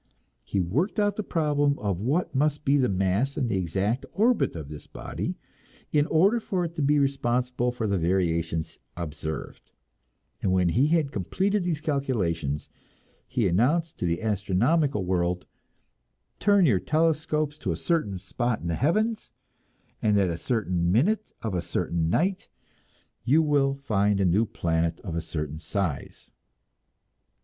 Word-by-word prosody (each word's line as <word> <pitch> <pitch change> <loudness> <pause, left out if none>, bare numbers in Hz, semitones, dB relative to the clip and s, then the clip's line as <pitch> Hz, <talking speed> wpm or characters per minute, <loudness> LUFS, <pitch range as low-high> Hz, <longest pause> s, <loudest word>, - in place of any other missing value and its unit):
He 100 - -2
worked 130 - 0
out 205 -1 +2
the 215 - -2
problem 145 -6 +1
of 100 -4 -2
what 140 - 0
must 150 +2 0
be 140 - +4
the 130 -3 +3
mass 95 +8 0
and 130 -5 0
the 100 - 0
exact 95 +7 -1
orbit 230 - +2
of 80 -4 -6
this 75 0 -10
body, - - -5 0.5
in 150 0 +3
order 195 +9 +4
for 190 -5 -1
it 165 - -6
to - - 0
be 145 +1 +3
responsible 125 -3 0
for 120 -2 -3
the 100 -3 +1
variations 85 -2 0 0.2
observed; 80 -2 -6 0.7
and 95 - +1
when 90 -2 +3
he 125 - +3
had 155 -3 +1
completed 190 - 0
these 170 -4 -1
calculations, 95 - -1 0.6
he 120 -4 +1
announced 145 - +1
to - - -1
the 85 +4 -1
astronomical 110 - +1
world, 90 0 0 0.9
"Turn 200 -2 +4
your 110 - +4
telescopes 155 - 0
to - - -2
a - - -1
certain 155 - -1
spot 115 +5 -2
in - - -8
the - - 0
heavens 215 - 0 0.7
at 105 -1 +3
a 90 -4 +2
certain 90 -2 0
minute 205 - +2
of 110 -3 -2
a 90 - 0
certain 85 -1 -1
night, 185 - 0
and 115 +7 -13
you 160 +3 +6
will 140 -2 +2
find 105 -7 +1
a 95 - +3
new 100 +6 +3
planet 80 -2 -1
of 90 - -6
a 85 - -1
certain 75 -2 -5
size." 90 -4 -4
120 Hz, 155 wpm, -26 LUFS, 90-150 Hz, 0.9 s, you